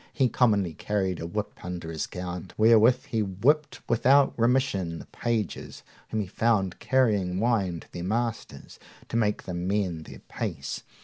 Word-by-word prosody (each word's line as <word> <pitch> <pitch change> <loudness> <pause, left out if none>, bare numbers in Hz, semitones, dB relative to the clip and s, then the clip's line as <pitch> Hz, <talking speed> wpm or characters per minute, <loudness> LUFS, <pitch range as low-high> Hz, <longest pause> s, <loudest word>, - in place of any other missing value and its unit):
He 130 -3 +2
commonly 105 -10 +2
carried 95 -1 -1
a 85 - -4
whip 105 +3 -5
under 90 -2 -5
his 80 - -3
gown, 90 -1 -6
wherewith 115 +2 +5
he 110 - 0
whipped 135 +10 0
without 135 +4 +4
remission 115 -8 +1
the - - -9
pages 115 -5 -3 0.3
whom 110 - -1
he - - -3
found 95 -2 0
carrying 105 -9 +2
wine 100 -7 +1
to - - -18
their 85 - -6
masters, 115 +4 -3 0.3
to - - -4
make 105 -3 +1
them 90 -1 -4
mend 95 -5 -1
their - - -11
pace. - - -4
105 Hz, 160 wpm, -27 LUFS, 90-115 Hz, 0.3 s, wherewith